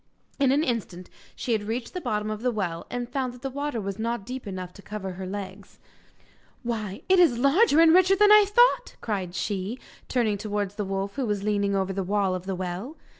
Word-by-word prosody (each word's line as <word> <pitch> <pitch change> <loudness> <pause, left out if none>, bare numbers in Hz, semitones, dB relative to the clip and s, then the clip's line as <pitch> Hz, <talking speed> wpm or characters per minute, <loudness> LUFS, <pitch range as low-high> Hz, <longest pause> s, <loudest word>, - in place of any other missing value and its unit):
In 275 -2 +4
an 290 +3 +3
instant 205 - -3 0.2
she 245 - -4
had 220 -2 +2
reached 230 +2 -3
the 365 - -4
bottom 210 -6 -2
of 215 0 -5
the 250 - +1
well, 185 -7 -3
and 245 -1 -3
found 260 -1 -2
that 250 +1 -15
the 270 - -3
water 285 -2 -3
was 200 0 -5
not 230 -2 -2
deep 255 -2 -6
enough 185 -2 -6
to - - -13
cover 205 -2 -6
her 185 +1 -6
legs. 195 0 -7 0.9
'Why, 215 -5 -4
it 375 0 +5
is 325 -10 +5
larger 290 - +4
and 330 -1 +7
richer 370 +2 +6
than 415 +1 +5
I 425 -1 +8
thought,' 485 +4 +3
cried 190 -5 -3
she, 200 +4 -2 0.3
turning 220 -5 +1
towards 205 -2 -2
the 205 0 -3
wolf, 195 +3 -3
who 265 -3 -1
was 205 -2 -1
leaning 200 -1 +1
over 195 0 0
the 195 - -2
wall 195 0 0
of 185 0 -5
the 190 - -1
well. 185 - -5
215 Hz, 220 wpm, -26 LUFS, 195-260 Hz, 0.9 s, I